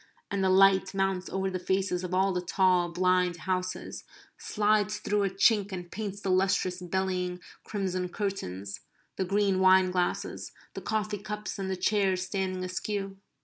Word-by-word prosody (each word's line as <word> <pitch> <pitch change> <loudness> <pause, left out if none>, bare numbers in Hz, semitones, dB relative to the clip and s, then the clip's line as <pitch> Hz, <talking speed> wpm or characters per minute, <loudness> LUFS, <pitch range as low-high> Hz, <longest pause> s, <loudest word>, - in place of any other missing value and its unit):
And 200 -1 0
the 190 - +3
light 190 0 +5
mounts 195 -1 0
over 190 0 -1
the 185 - -3
faces 190 0 0
of 180 - -4
all 190 +1 +2
the 180 - -1
tall 180 -1 +2
blind 180 0 +2
houses, 185 0 -3 0.3
slides 210 -1 +1
through 210 0 0
a 195 - +1
chink 200 +1 +3
and 180 -2 -6
paints 205 -1 -5
the 195 - -1
lustrous 185 -1 +1
bellying 180 0 -2 0.2
crimson 185 -3 -2
curtains; 100 - -4 0.4
the 190 - -1
green 195 0 +2
wine 185 0 +5
glasses; 180 -1 -2 0.2
the - - -6
coffee 215 -1 -2
cups; 210 +1 -5
and 190 -1 -3
the 190 - -1
chairs 190 -1 +1
standing 185 -1 -2
askew. 195 +1 -3
190 Hz, 160 wpm, -29 LUFS, 185-195 Hz, 0.4 s, light